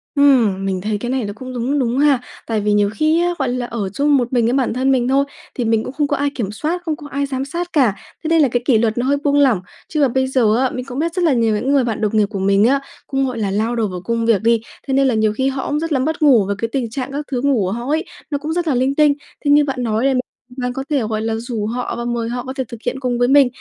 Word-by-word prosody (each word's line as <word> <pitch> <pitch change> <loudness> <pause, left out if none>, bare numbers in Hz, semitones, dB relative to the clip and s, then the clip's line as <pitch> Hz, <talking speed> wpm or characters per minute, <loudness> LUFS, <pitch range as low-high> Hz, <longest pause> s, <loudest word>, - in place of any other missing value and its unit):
Ừm, 240 -9 +4
mình 190 -1 -1
thấy 210 +1 -1
cái 240 +4 -4
này 260 -4 -1
nó 205 - -5
cũng 255 +3 -8
đúng 255 +4 -1
đúng 245 -1 0
ha. 285 -4 +4 0.3
Tại 220 -2 0
vì 210 0 +1
nhiều 205 -1 +3
khi 315 +2 +2
á, 350 0 +1
gọi 265 -3 0
là, 245 0 -2
ở 225 -5 -3
chung 285 +8 +2
một 245 0 -2
mình 235 -2 +3
với 235 - +1
bản 265 -4 +1
thân 260 +2 +1
mình 250 -2 +2
thôi, 275 +1 +3 0.3
thì 245 - -2
mình 225 -1 +2
cũng 255 - -6
không 290 0 0
có 285 - 0
ai 285 0 +1
kiểm 210 -5 -2
soát, 315 +11 -2
không 315 -2 -1
có 295 -1 -10
ai 280 +1 -1
giám 270 -1 -3
sát 345 +5 -5
cả, 250 -10 +3 0.3
thế - - -2
nên 325 0 +4
là 280 - +5
cái 245 0 -1
kỷ 255 -5 +4
luật 220 0 0
nó 245 - 0
hơi 280 +2 +2
buông 285 0 +3
lỏng, 260 -9 +4 0.3
chứ 305 - -1
mà 275 - +5
bây 260 +2 0
giờ 240 -5 +2
á, 260 0 +2
mình 255 0 -5
cũng 265 +1 -6
biết 335 +1 -1
rất 360 -1 -1
là 310 - +4
nhiều 230 -3 +2
những 255 +6 -1
người 275 -3 +4
bạn 225 -3 -2
đồng 215 0 +1
nghiệp 210 - +4
của 200 -1 -5
mình 195 +1 +3
á, 275 +2 +3 0.3
cũng, 270 -1 0
gọi 250 -3 -4
là, 200 -3 -1
lao 220 +4 0
đầu 225 -3 0
vào 180 -2 -6
công 230 +3 -1
việc 225 -4 +3
đi, 230 0 +3 0.3
thế 270 - -1
nên 270 0 +3
là 255 - +2
nhiều 215 -1 +2
khi 265 +4 0
họ 270 -1 -2
cũng 295 - 0
rất 330 +1 -3
là 270 - +2
mất 315 +4 -1
ngủ 250 -9 +5
với 200 - -2
cái 230 - -1
tình 255 -4 -1
trạng 265 +3 -4
các 290 +1 -4
thứ 250 -2 -1
ngủ 280 0 +2
của 185 - -2
họ 240 +2 -4
ấy, 315 +4 0 0.2
nó 285 - -1
cũng 310 +3 -4
rất 345 0 -1
là 290 - +2
linh 260 +3 +1
tinh. 300 -2 +5 0.3
Thế 285 - +3
như 295 +1 +6
bạn 260 -3 -3
nói 225 +2 0
này 275 - +3 0.4
bạn 250 -1 -2
có 270 - -4
thể, 290 -3 +1
gọi 215 0 -2
là, 225 0 -1
rủ 225 -2 -3
họ 240 +1 -3
và 235 - -4
mời 235 -1 -2
họ 245 +1 -3
có 260 +1 -6
thể 265 -1 -2
thực 235 - -8
hiện 265 - -2
cùng 245 -2 -1
với 245 - +3
mình, 275 0 +6
255 Hz, 325 wpm, -19 LUFS, 225-280 Hz, 0.4 s, như